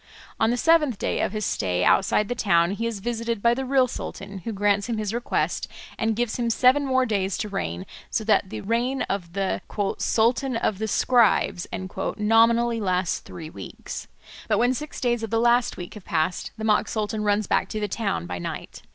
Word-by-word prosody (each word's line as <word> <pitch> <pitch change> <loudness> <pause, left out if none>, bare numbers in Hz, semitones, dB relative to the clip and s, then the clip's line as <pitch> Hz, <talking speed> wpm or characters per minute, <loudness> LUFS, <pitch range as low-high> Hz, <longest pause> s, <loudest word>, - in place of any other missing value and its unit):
On 220 - +3
the 240 - +1
seventh 300 -5 +3
day - - -1
of - - 0
his 215 -1 -2
stay 90 -2 0
outside 195 - +3
the 245 - -1
town 170 -7 +2
he 230 +3 -2
is 220 -4 -4
visited 230 0 -2
by 235 +3 +4
the 265 +2 -3
real 260 -1 +4
sultan, 200 -4 -7
who 205 +6 -5
grants 205 +1 +1
him 230 - -1
his 215 -1 -2
request 235 +1 -1 0.3
and 225 -1 0
gives 240 0 -1
him 235 -1 0
seven 260 +4 +4
more 260 -1 +3
days 200 -4 -1
to 210 - -3
reign, 85 - -3 0.2
so 220 - -1
that 210 -3 +2
the - - -5
reign 240 +5 0
of 175 -4 -4
"the 195 -1 -1 0.4
Sultan 240 +3 +1
of 210 -3 -1
the 220 - -1
Scribes" 215 -6 +2 0.5
nominally 230 +2 +3
lasts 185 -2 0
three 160 -2 -9
weeks. 95 -2 -8 0.4
But - - +2
when 245 +2 +3
six 300 +3 -6
days 240 -2 0
of 225 - -4
the 225 +1 +1
last 240 +1 +3
week 175 -1 -7
have 210 -4 -11
passed 165 -1 -1
the 220 - -6
mock 215 -1 +3
sultan 215 0 -2
runs 205 0 +2
back - - +1
to 215 - -3
the 210 - -1
town 200 - -2
by 90 0 -5
night. - - -6
220 Hz, 205 wpm, -25 LUFS, 195-235 Hz, 0.5 s, by